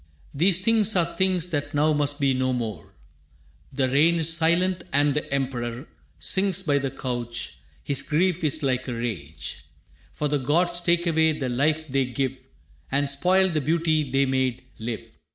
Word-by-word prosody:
These 170 Hz, +5 st, +3 dB
things 220 Hz, -2 st, +3 dB
are 170 Hz, -2 st, +1 dB
things 185 Hz, -2 st, +1 dB
that 145 Hz, -2 st, -3 dB
now 155 Hz, +2 st, +3 dB
must 145 Hz, 0 st, 0 dB
be 140 Hz, -2 st, +2 dB
no 130 Hz, 0 st, 0 dB
more. 110 Hz, -8 st, -5 dB, 0.8 s
The 130 Hz, -1 st, 0 dB
rain 150 Hz, +6 st, +3 dB
is 165 Hz, 0 st, +2 dB
silent, 170 Hz, +3 st, +2 dB
and 145 Hz, +1 st, +3 dB
the 150 Hz, -1 st, -3 dB
Emperor 130 Hz, -1 st, -3 dB, 0.3 s
Sinks 190 Hz, -1 st, +2 dB
by 145 Hz, -5 st, +2 dB
the 135 Hz, 0 st, -2 dB
couch. 120 Hz, -, -5 dB, 0.2 s
His 140 Hz, -1 st, 0 dB
grief 170 Hz, +4 st, 0 dB
is 155 Hz, 0 st, +1 dB
like 130 Hz, -1 st, 0 dB
a 125 Hz, -, -3 dB
rage, 100 Hz, -11 st, -5 dB, 0.5 s
For 150 Hz, -, -2 dB
the 145 Hz, 0 st, 0 dB
gods 175 Hz, +6 st, +2 dB
take 175 Hz, 0 st, +1 dB
away 160 Hz, -1 st, +3 dB
the 140 Hz, -4 st, -3 dB
life 155 Hz, +5 st, 0 dB
they 135 Hz, -1 st, 0 dB
give 130 Hz, +1 st, -2 dB, 0.6 s
And 140 Hz, +1 st, +1 dB
spoil 185 Hz, +7 st, +2 dB
the 155 Hz, -3 st, -1 dB
beauty 155 Hz, -1 st, +1 dB
they 135 Hz, +2 st, +2 dB
made 130 Hz, -2 st, -1 dB, 0.2 s
live. 115 Hz, 0 st, -4 dB
145 Hz, 170 wpm, -24 LUFS, 130-165 Hz, 0.8 s, These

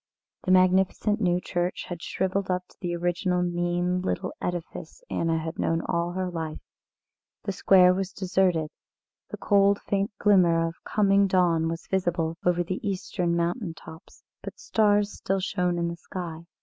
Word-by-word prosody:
The 185 Hz, -, +1 dB
magnificent 190 Hz, +3 st, +3 dB
new 180 Hz, -2 st, +2 dB
church 175 Hz, 0 st, -2 dB
had 175 Hz, -2 st, -6 dB
shrivelled 190 Hz, +2 st, -2 dB
up 180 Hz, 0 st, -1 dB
to -, -, -22 dB
the 175 Hz, -2 st, -2 dB
original 180 Hz, +1 st, 0 dB
mean 175 Hz, +1 st, 0 dB
little 185 Hz, 0 st, -2 dB
edifice 175 Hz, -, -5 dB
Anna 165 Hz, -1 st, 0 dB
had 160 Hz, +1 st, -5 dB
known 165 Hz, 0 st, 0 dB
all 170 Hz, +1 st, -1 dB
her 185 Hz, 0 st, -2 dB
life. 165 Hz, -3 st, -4 dB, 0.9 s
The 200 Hz, -, -2 dB
square 185 Hz, -1 st, +5 dB
was 190 Hz, 0 st, -3 dB
deserted, 185 Hz, -5 st, 0 dB, 0.6 s
the -, -, -6 dB
cold 200 Hz, 0 st, +3 dB
faint 200 Hz, +1 st, -1 dB
glimmer 175 Hz, -5 st, +4 dB
of 165 Hz, -, -9 dB
coming 200 Hz, -1 st, +3 dB
dawn 175 Hz, -4 st, +2 dB
was 165 Hz, +1 st, -5 dB
visible 175 Hz, -3 st, -1 dB
over 175 Hz, 0 st, +2 dB
the 185 Hz, +2 st, -4 dB
eastern 180 Hz, -3 st, -2 dB
mountain 170 Hz, +1 st, -1 dB
tops, 160 Hz, 0 st, -14 dB, 0.2 s
but -, -, -8 dB
stars 210 Hz, -, +2 dB
still 195 Hz, +1 st, -2 dB
shone 180 Hz, -2 st, -1 dB
in 170 Hz, 0 st, 0 dB
the 170 Hz, -, -4 dB
sky. 170 Hz, -2 st, -7 dB
180 Hz, 160 wpm, -26 LUFS, 170-190 Hz, 0.9 s, square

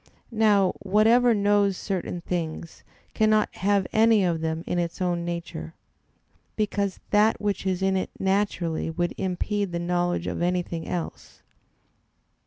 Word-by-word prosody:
Now 210 Hz, -4 st, +3 dB
whatever 225 Hz, +4 st, +4 dB
knows 200 Hz, -1 st, +2 dB
certain 180 Hz, -2 st, -3 dB
things 165 Hz, -1 st, -5 dB, 0.3 s
cannot 215 Hz, 0 st, +2 dB
have 200 Hz, 0 st, +2 dB
any 220 Hz, -2 st, +5 dB
of 165 Hz, -2 st, 0 dB
them 160 Hz, 0 st, -2 dB
in 175 Hz, -, -1 dB
its 170 Hz, -1 st, -3 dB
own 175 Hz, -2 st, 0 dB
nature; 170 Hz, -, -5 dB, 0.8 s
because 200 Hz, -2 st, -1 dB
that 210 Hz, +2 st, +4 dB
which 205 Hz, -2 st, -2 dB
is 190 Hz, 0 st, -1 dB
in 190 Hz, 0 st, +2 dB
it 185 Hz, -, -1 dB
naturally 190 Hz, -5 st, 0 dB
would 175 Hz, +2 st, -2 dB
impede 195 Hz, +1 st, -2 dB
the 170 Hz, -, -2 dB
knowledge 175 Hz, 0 st, -1 dB
of -, -, -3 dB
anything 175 Hz, -2 st, -1 dB
else. 175 Hz, -2 st, -6 dB
185 Hz, 135 wpm, -25 LUFS, 175-205 Hz, 0.8 s, any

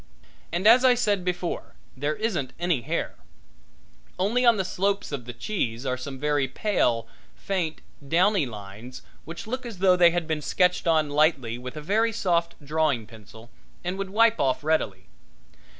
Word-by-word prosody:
And, 175 Hz, +4 st, -2 dB
as 235 Hz, +4 st, +7 dB
I 255 Hz, -1 st, +6 dB
said 205 Hz, -6 st, 0 dB
before, 180 Hz, -1 st, -3 dB, 0.2 s
there 145 Hz, +3 st, -1 dB
isn't 180 Hz, -, -2 dB
any 175 Hz, -7 st, +1 dB
hair; -, -, -3 dB, 1.0 s
only 215 Hz, +7 st, +1 dB
on 235 Hz, -3 st, +5 dB
the 190 Hz, -, -1 dB
slopes 200 Hz, +1 st, -1 dB
of 135 Hz, -5 st, -5 dB
the 120 Hz, -, -6 dB
cheese 120 Hz, -, -3 dB
are 130 Hz, -1 st, 0 dB
some 130 Hz, +1 st, -7 dB
very 145 Hz, -1 st, +1 dB
pale, 120 Hz, -, 0 dB, 0.3 s
faint, 175 Hz, -5 st, -3 dB, 0.3 s
downy 180 Hz, 0 st, +3 dB
lines, 105 Hz, +3 st, -10 dB, 0.2 s
which 165 Hz, +2 st, -7 dB
look 255 Hz, +4 st, -4 dB
as 235 Hz, -5 st, -7 dB
though 185 Hz, 0 st, +4 dB
they 175 Hz, -1 st, +6 dB
had 175 Hz, 0 st, -1 dB
been 155 Hz, -2 st, -1 dB
sketched 180 Hz, +3 st, +1 dB
on 155 Hz, -3 st, +2 dB
lightly 140 Hz, -6 st, +2 dB
with 125 Hz, +4 st, -8 dB
a -, -, -5 dB
very 220 Hz, +8 st, +1 dB
soft 170 Hz, -6 st, 0 dB
drawing 150 Hz, -6 st, 0 dB
pencil 110 Hz, +1 st, -15 dB, 0.3 s
and 180 Hz, +2 st, -3 dB
would 195 Hz, -1 st, -3 dB
wipe 230 Hz, +3 st, +3 dB
off 130 Hz, +2 st, +1 dB
readily. 110 Hz, -12 st, 0 dB
165 Hz, 165 wpm, -25 LUFS, 130-195 Hz, 1.0 s, as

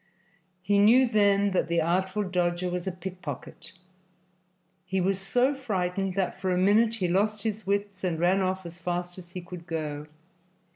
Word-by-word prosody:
He 200 Hz, 0 st, +3 dB
knew 235 Hz, +6 st, +6 dB
then 200 Hz, -2 st, +3 dB
that 185 Hz, -, +1 dB
the 170 Hz, 0 st, +1 dB
Artful 185 Hz, +5 st, 0 dB
Dodger 180 Hz, -1 st, -1 dB
was 180 Hz, +1 st, -3 dB
a -, -, 0 dB
pickpocket. 180 Hz, -5 st, -7 dB, 1.1 s
He 190 Hz, +1 st, -2 dB
was 190 Hz, +1 st, +1 dB
so 245 Hz, +8 st, +2 dB
frightened 195 Hz, -7 st, -2 dB
that 190 Hz, -1 st, -2 dB
for 190 Hz, -, 0 dB
a 180 Hz, -, +1 dB
minute 215 Hz, +5 st, +4 dB
he 190 Hz, -5 st, -1 dB
lost 210 Hz, +4 st, +1 dB
his 220 Hz, -2 st, -3 dB
wits 200 Hz, -1 st, -1 dB
and 170 Hz, -3 st, -1 dB
ran 180 Hz, +3 st, +3 dB
off 185 Hz, 0 st, -1 dB
as 170 Hz, +1 st, -9 dB
fast 175 Hz, +1 st, -3 dB
as 175 Hz, 0 st, -13 dB
he 180 Hz, -, -5 dB
could 170 Hz, -1 st, -10 dB
go. 150 Hz, -3 st, -4 dB
185 Hz, 175 wpm, -27 LUFS, 175-200 Hz, 1.1 s, knew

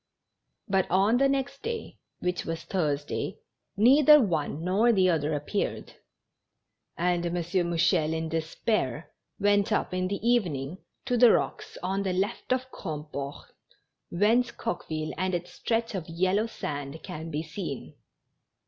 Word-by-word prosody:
But 190 Hz, -2 st, +1 dB
on 200 Hz, +6 st, +4 dB
the 275 Hz, +1 st, +4 dB
next 275 Hz, 0 st, -1 dB
day, 460 Hz, 0 st, -5 dB, 0.2 s
which 180 Hz, 0 st, -1 dB
was 165 Hz, 0 st, -4 dB
Thursday, 150 Hz, -6 st, -2 dB, 0.4 s
neither 285 Hz, +7 st, +7 dB
one 160 Hz, -, -1 dB
nor 195 Hz, +6 st, +2 dB
tlie 185 Hz, -4 st, +4 dB
other 155 Hz, -1 st, 0 dB
appeared; 150 Hz, +8 st, -3 dB, 1.0 s
and 175 Hz, 0 st, +1 dB
M. 175 Hz, 0 st, -2 dB
Mouchel, 170 Hz, -2 st, +1 dB
in 160 Hz, 0 st, -2 dB
despair, 160 Hz, -, -2 dB, 0.3 s
went 205 Hz, +1 st, +3 dB
up 210 Hz, -, 0 dB
in 185 Hz, 0 st, 0 dB
the 200 Hz, +4 st, -3 dB
evening 175 Hz, -, +1 dB, 0.3 s
to 250 Hz, -2 st, +1 dB
the 240 Hz, -1 st, +8 dB
rocks -, -, -1 dB
on 190 Hz, +2 st, 0 dB
the 190 Hz, -2 st, -1 dB
left 195 Hz, +7 st, -2 dB
of 255 Hz, 0 st, +1 dB
Grand 155 Hz, -4 st, -6 dB
port, 140 Hz, 0 st, -6 dB, 0.6 s
whence 225 Hz, +7 st, +3 dB
Coqueville 155 Hz, -8 st, -4 dB
and 185 Hz, -1 st, 0 dB
its 175 Hz, 0 st, -5 dB
stretch 230 Hz, 0 st, -1 dB
of 175 Hz, -4 st, -5 dB
yellow 185 Hz, +6 st, +1 dB
sand 145 Hz, -7 st, -5 dB
can 165 Hz, -4 st, -6 dB
be 155 Hz, 0 st, -2 dB
seen. 160 Hz, -4 st, -6 dB
185 Hz, 140 wpm, -28 LUFS, 160-215 Hz, 1.0 s, the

